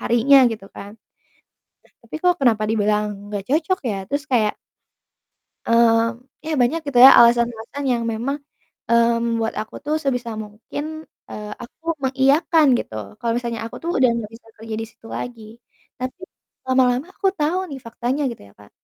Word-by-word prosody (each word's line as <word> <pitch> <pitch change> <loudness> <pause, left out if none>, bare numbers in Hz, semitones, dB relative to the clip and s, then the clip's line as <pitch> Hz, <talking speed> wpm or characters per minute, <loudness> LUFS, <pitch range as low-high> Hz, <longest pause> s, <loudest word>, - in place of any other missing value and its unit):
harinya 240 +4 +5
gitu 210 -3 -8
kan? 200 +1 -9 0.9
Nah, - - -29
tapi 230 - -9
kok 360 0 +4
kenapa 225 -5 +3
dibilang 210 -1 +1 0.3
enggak 200 -2 -3
cocok 325 +6 +1
ya? 200 - -2
Terus 285 +1 -1
kayak 215 -4 +2 1.1
mmm, 230 0 +3 0.2
ya 320 - -2
banyak 270 +8 +2
gitu 265 - -1
ya, - - +12
alasan-alasan 235 +3 +2
yang 235 -1 0
memang, 255 +6 -2 0.5
mmm, 235 0 +4
membuat 230 -1 -1
aku 220 - -10
tuh 300 +1 0
sebisa 245 -4 -1
mungkin, 215 +7 -8 0.5
eee, 210 0 -7
aku 315 +7 -16 0.2
mengiyakan 280 +5 +3
gitu 110 - -6 0.3
kalau 230 -1 -1
misalnya 235 -2 -4
aku 230 - -8
tuh 340 - -2
udah 255 -2 +4
enggak 225 -2 -5
bisa 225 - -19
kerja 225 0 -6
di - - -4
situ 225 - -17
lagi. 240 -2 -6 0.6
Tapi 255 +7 -5 0.5
lama-lama 255 +3 +2
aku 390 - 0
tahu 310 +5 +1
nih 270 - -6
faktanya 245 +5 -3
gitu - - -11
ya, - - -22
Kak. 105 - -17
235 Hz, 160 wpm, -21 LUFS, 225-275 Hz, 1.1 s, ya